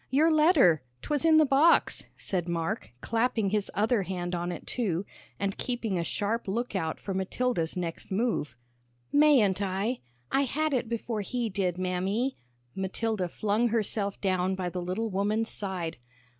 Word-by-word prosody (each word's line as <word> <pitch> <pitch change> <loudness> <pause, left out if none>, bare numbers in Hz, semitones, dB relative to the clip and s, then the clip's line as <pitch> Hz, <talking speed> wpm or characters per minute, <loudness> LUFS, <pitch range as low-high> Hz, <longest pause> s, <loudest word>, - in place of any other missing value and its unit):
"Your 310 +5 +4
letter. 300 - +5 0.2
'Twas 295 -2 0
in 320 -1 +6
the 310 - +6
box," 285 +5 +4
said 180 -3 -2
Mark, 170 - -2
clapping 225 -3 +1
his 210 -1 0
other 220 +1 +2
hand 180 -1 -3
on 175 0 -2
it, 175 - -7
too, 200 -7 -1 0.3
and 200 -1 -2
keeping 230 -7 -1
a - - 0
sharp 210 +6 -2
lookout 195 -6 -2
for 195 - -4
Matilda's 190 -2 -1
next 170 -2 -4
move. 190 - -1 0.5
"Mayn't 260 -11 +5
I? 200 +6 -1 0.3
I 275 +1 +3
had 310 +4 0
it 240 -3 0
before 230 -1 -2
he 235 +2 -2
did, 185 -2 0
Mammy." 190 +8 -1 0.4
Matilda 190 0 -1
flung 215 +6 +1
herself 210 -3 -1
down 185 -1 +1
by 185 -1 -2
the 180 +1 -4
little 195 +5 -2
woman's 210 +4 0
side. 185 - -3
205 Hz, 155 wpm, -28 LUFS, 185-240 Hz, 0.5 s, in